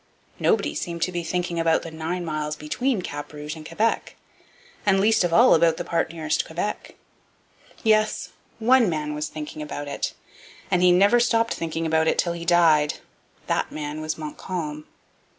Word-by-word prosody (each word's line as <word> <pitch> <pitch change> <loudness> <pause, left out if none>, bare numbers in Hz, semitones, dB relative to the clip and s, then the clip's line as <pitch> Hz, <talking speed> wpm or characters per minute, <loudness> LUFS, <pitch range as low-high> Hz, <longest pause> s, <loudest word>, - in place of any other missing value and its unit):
Nobody 75 - +2
seemed 170 - -3
to 185 - -1
be 175 -1 -3
thinking 175 0 -2
about 165 -1 +2
the 165 - -7
nine 165 +3 -3
miles 155 -1 -2
between 190 - -1
Cap 145 - -6
Rouge 150 +1 -6
and 160 - -10
Quebec, 215 +8 -1 0.7
and 195 -1 +3
least 215 0 +3
of 175 - 0
all 235 +9 +6
about 165 0 +4
the 175 - -3
part 170 -2 -1
nearest 155 -2 -1
Quebec. 175 +6 -4 0.9
Yes, 215 -1 +2 0.3
one 240 -1 +4
man 150 -2 -2
was 150 +1 -3
thinking 155 0 -7
about 145 -1 -5
it, 140 - -3 0.6
and 180 - +3
he 180 0 +6
never 200 +7 +5
stopped 230 -1 +2
thinking 165 0 -3
about 160 0 +2
it - - +2
till 170 - +1
he 170 0 -6
died. 165 -4 +4 0.5
That - - -1
man 150 0 -5
was 155 0 -3
Montcalm. 155 -1 -5
165 Hz, 170 wpm, -24 LUFS, 155-180 Hz, 0.9 s, all